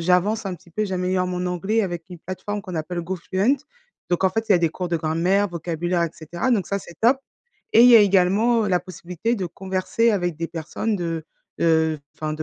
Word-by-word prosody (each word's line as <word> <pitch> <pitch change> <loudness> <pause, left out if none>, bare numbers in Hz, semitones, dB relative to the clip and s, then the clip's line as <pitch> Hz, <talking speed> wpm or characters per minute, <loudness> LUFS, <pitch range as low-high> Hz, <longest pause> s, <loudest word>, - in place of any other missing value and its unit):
j'avance 185 +6 +2
un 190 -2 -3
petit 175 - -17
peu. 215 +6 -1
J'améliore 185 -1 0
mon 180 0 -2
anglais 195 +5 0
avec 175 -5 -3
une 175 - -8
plateforme 205 +4 -5
qu'on 185 -4 -8
appelle 175 +2 -3
Gofluent. 190 +8 0 0.5
Donc 175 - +1
en 190 - +5
fait, 225 +4 -2
il - - +9
y - - +6
a - - +4
des 170 -1 +2
cours 180 +3 -5
de 170 -1 0
grammaire, 175 +6 +1
vocabulaire 170 +1 -2
et 170 - -1
cetera, 170 - -3
donc 205 -7 +2
ça, 200 - -1
c'est 175 -2 -12
top! 240 +4 +5 0.6
Et - - +7
il 245 - +8
y 240 - +9
a - - +9
également 205 +4 +3
la 180 -1 +3
possibilité 180 +5 -3
de 195 -6 -3
converser 190 +6 0
avec 175 -6 -1
des 165 - -3
personnes 175 +7 -3
de, 165 -3 -3 0.4
heu, - - +2
heu 160 -1 +3 0.2
enfin 155 -1 -3
de 155 - -4
180 Hz, 225 wpm, -23 LUFS, 170-200 Hz, 0.6 s, il